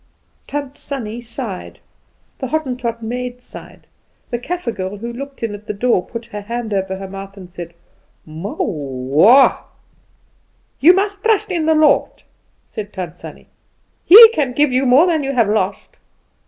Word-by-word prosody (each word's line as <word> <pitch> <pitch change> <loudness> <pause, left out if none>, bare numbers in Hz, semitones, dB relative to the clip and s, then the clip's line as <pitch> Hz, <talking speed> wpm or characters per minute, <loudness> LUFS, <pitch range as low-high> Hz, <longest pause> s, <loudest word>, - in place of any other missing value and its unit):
Tant 285 -1 -5
Sannie 240 -4 -6
sighed, 230 -5 -6 0.6
the 265 - -3
Hottentot 250 -5 -3
maid 245 +2 -5
sighed, 250 - -13 0.5
the 240 - -2
Kaffer 345 -1 -4
girl 195 -1 -5
who 235 +3 -6
looked 275 +1 -9
in 225 -2 -2
at 205 +1 -11
the 210 - -4
door 220 -3 +1
put 230 +4 -8
her 210 -3 -8
hand 230 +1 -5
over 190 -1 -2
her 195 0 -7
mouth 195 +1 -9
and 180 -2 -12
said 170 -1 -9 0.5
"Mow 160 +6 -7
wah!" 145 - +3 1.2
"You 345 +6 +7
must 400 +1 -2
trust 440 -3 +1
in 330 -3 -1
the 320 - +4
Lord," 310 -2 +2 0.4
said 210 -1 -8
Tant 180 -3 -6
Sannie. - - -12 0.6
"He 445 +5 +10
can 290 - -1
give 295 +1 +2
you 255 +1 +1
more 265 +7 +6
than 325 -5 0
you 275 0 -2
have 235 -5 +2
lost." 205 -2 -2
235 Hz, 160 wpm, -18 LUFS, 195-280 Hz, 1.2 s, He